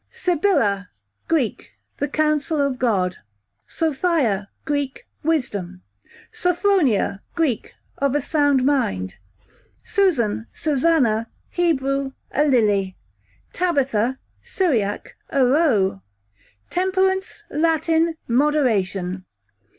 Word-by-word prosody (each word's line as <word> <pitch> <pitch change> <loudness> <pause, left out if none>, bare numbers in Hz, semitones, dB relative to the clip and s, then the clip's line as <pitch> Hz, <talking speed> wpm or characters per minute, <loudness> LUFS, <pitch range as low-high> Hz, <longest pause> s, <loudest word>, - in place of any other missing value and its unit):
Sibylla, 335 - +1 0.4
Greek, 295 -9 -1 0.3
the 290 - 0
counsel 305 +1 0
of 280 -3 0
God. 190 -7 +1 0.5
Sophia, 280 - 0 0.2
Greek, 285 -3 -2 0.2
wisdom. 200 - -2 0.5
Sophronia, 360 - +1
Greek, 300 -10 -1 0.2
of 280 0 +1
a - - +3
sound 285 -3 +2
mind. 95 - 0 0.7
Susan 240 - +1
/ - - -40
Susanna 265 -7 +2 0.2
Hebrew, 275 -5 0 0.2
a 295 - +2
lily. 205 -8 +2 0.6
Tabitha, 265 -8 +1 0.2
Syriac, 235 - -1
a 275 -2 +3
roe. 245 - +2 0.7
Temperance, 380 +2 0
Latin, 325 +1 +2
moderation. 210 -9 +1
275 Hz, 85 wpm, -22 LUFS, 215-325 Hz, 0.7 s, a